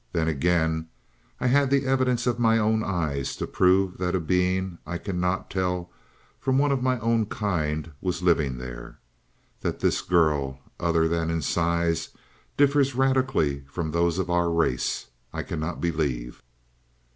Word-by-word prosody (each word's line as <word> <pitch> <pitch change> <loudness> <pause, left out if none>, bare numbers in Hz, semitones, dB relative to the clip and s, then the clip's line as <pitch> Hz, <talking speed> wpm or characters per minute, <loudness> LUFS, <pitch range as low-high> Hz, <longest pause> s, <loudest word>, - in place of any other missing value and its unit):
Then, 80 -2 +1
again, 80 +1 +1 0.5
I - - -3
had 140 +2 +4
the 140 0 +2
evidence 130 -2 +1
of 120 -1 0
my 115 -1 +4
own 110 0 +2
eyes 75 -9 -2
to - - -3
prove 95 0 +2
that 90 0 0
a - - +2
being 90 +1 0
I 85 - -4
could 95 +3 -5
not 90 +1 -1
tell 90 -2 -1 0.5
from 130 +1 +1
one 145 +1 +3
of 135 -2 +1
my 130 0 +1
own 115 -1 +1
kind 80 -7 -2
was 90 -1 -2
living 75 -7 +2
there. - - -8 0.6
That - - -3
this - - +1
girl, 75 -6 +1 0.2
other 85 -1 +2
than 85 0 0
in 80 -2 -1
size, 85 +1 0 0.5
differs 140 -2 +3
radically 130 - +2
from 80 +3 -4
those 85 +1 +1
of 95 -1 -1
our 85 0 +2
race, 85 -7 0 0.3
I - - -3
cannot 80 +2 -4
believe. 70 -8 -2
90 Hz, 155 wpm, -26 LUFS, 80-110 Hz, 0.6 s, had